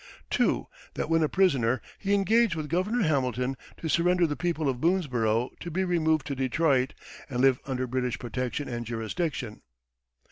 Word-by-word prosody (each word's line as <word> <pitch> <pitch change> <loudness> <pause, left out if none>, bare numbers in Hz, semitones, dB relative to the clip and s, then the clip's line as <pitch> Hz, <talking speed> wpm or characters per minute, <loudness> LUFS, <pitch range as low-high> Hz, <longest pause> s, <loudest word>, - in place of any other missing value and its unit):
"2. - - +2 0.3
That 160 - -3
when 165 0 +4
a 155 - +2
prisoner, 130 -11 +2 0.2
he 200 0 +1
engaged 220 0 +3
with 155 -2 -5
Gov. 180 +3 +1 0.2
Hamilton 130 -3 0 0.2
to 165 - -5
surrender 175 +2 +3
the 150 -2 -1
people 160 -3 -1
of 130 -2 -1
Boonesborough 125 - +1
to 175 - -6
be 185 +3 0
removed 160 -4 +1
to 140 - -3
Detroit, 135 0 +1 0.3
and 125 -3 -3
live 130 -1 +4
under 130 -1 -1
British 125 -1 -1
protection 125 +4 -3
and 120 -2 -4
jurisdiction. 120 +2 -3
140 Hz, 165 wpm, -28 LUFS, 125-170 Hz, 0.3 s, when